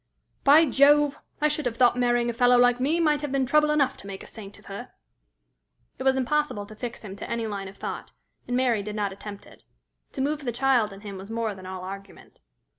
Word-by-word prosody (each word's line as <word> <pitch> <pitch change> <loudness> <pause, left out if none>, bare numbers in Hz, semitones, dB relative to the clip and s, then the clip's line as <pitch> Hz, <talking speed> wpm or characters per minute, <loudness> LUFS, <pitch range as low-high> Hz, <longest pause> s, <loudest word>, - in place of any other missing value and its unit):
"By 300 +4 +7
Jove! 290 +1 +4 0.2
I 300 - +4
should 300 -2 0
have 230 -1 -4
thought 245 -1 +5
marrying 240 -1 +2
a - - -9
fellow 245 +1 +4
like 245 0 +4
me 295 +6 +1
might 300 -3 +2
have 295 -2 -4
been 270 -1 +1
trouble 300 +3 +3
enough 285 -3 +2
to 200 - -11
make 195 -1 -7
a - - -11
saint 205 -3 -11
of 205 - -19
her." 200 +6 -8 1.1
It - - -4
was 265 0 +3
impossible 265 -5 0
to 215 - -12
fix 235 +2 -7
him 195 -2 -8
to - - -7
any 235 -1 -2
line 200 -2 -4
of 195 - -12
thought, - - -6 0.4
and 245 - 0
Mary 245 -5 +2
did 210 +1 -6
not 205 -2 -1
attempt 200 +1 -9
it. - - -18 0.5
To 265 - -3
move 295 +2 -1
the 245 - -1
child 245 -3 +2
in 195 0 -11
him 200 -2 -8
was 195 +2 -9
more 225 -1 -2
than 185 -1 -11
all 185 -1 -6
argument. 195 +1 -10
240 Hz, 235 wpm, -26 LUFS, 205-275 Hz, 1.1 s, By